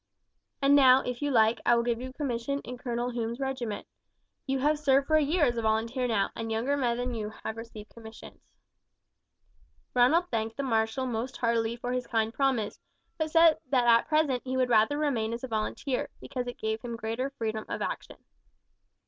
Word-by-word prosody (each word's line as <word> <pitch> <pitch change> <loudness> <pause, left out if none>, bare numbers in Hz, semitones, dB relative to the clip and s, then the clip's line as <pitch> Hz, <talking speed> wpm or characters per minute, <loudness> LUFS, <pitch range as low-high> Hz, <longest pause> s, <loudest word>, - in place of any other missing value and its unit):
And 280 +1 +6
now, 265 -2 +7
if 250 +1 -4
you 290 - 0
like, 225 -3 +3
I 240 - +4
will 235 - +2
give 235 0 -1
you 260 - -5
a - - -13
commission 275 -1 -2
in 250 - -7
Colonel 245 0 -2
Hume's 235 0 -3
regiment. 260 -6 -3 0.6
You 270 0 0
have 295 +3 +1
served 275 -2 +3
for 310 - +2
a 310 - +5
year 300 +2 +2
as 240 -3 0
a - - 0
volunteer 230 +3 0
now, 210 -4 0
and 225 0 -4
younger 235 +6 0
men 245 -4 0
than 245 0 -2
you 215 -2 -3
have 220 - -3
received 225 -2 -10
commissions." 220 -1 -12 1.5
Ronald 300 +9 +4
thanked 225 0 -2
the 280 - -2
marshal 225 0 0
most 245 +1 -3
heartily 230 -1 0
for 245 +1 -4
his 250 -1 -2
kind 225 -1 0
promise, 260 -7 0 0.4
but 315 0 0
said 330 0 +5
that 250 -3 +3
at 235 -1 +5
present 305 -5 +2
he 260 0 -3
would 255 -1 +2
rather 225 +5 +4
remain 240 -7 0
as 235 - -6
a - - -3
volunteer, 235 +4 -2
because 250 -2 -5
it 245 - -6
gave 220 0 -2
him 235 -1 -5
greater 230 +4 -3
freedom 220 -5 -4
of - - -3
action. - - -5
245 Hz, 200 wpm, -28 LUFS, 225-270 Hz, 1.5 s, now